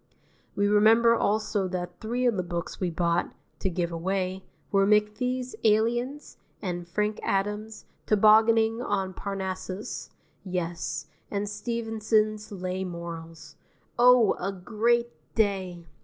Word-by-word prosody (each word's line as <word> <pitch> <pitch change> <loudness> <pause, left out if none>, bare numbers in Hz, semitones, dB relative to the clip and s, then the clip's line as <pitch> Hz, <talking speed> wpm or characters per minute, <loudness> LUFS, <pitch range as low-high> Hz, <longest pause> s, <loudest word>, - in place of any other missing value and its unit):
We 200 0 +2
remember 220 +3 +5
also 210 -3 0
that 180 -1 -5
three 240 +3 -2
of 240 -3 +3
the 185 - 0
books 170 0 -5
we 185 - 0
bought 170 0 0 0.2
(to 190 - 0
give 175 -1 -2
away) 185 +2 -2 0.3
were 195 -1 +4
McFee's 230 +5 +1
"Aliens" 240 +6 +1 0.2
and 175 -2 -4
Frank 210 +4 -1
Adams's 210 +2 -2 0.2
"Tobogganing 220 +2 +5
on 195 -5 -1
Parnassus," 190 0 -5 0.3
yes, 170 -6 -3 0.2
and 205 0 -2
Stevenson's 215 -1 -1
"Lay 185 -1 -3
Morals." 165 -3 -8 0.4
Oh, 245 -3 +6
a 195 +2 -2
great 230 +5 0 0.2
day! 190 -5 0
205 Hz, 115 wpm, -27 LUFS, 180-220 Hz, 0.4 s, Oh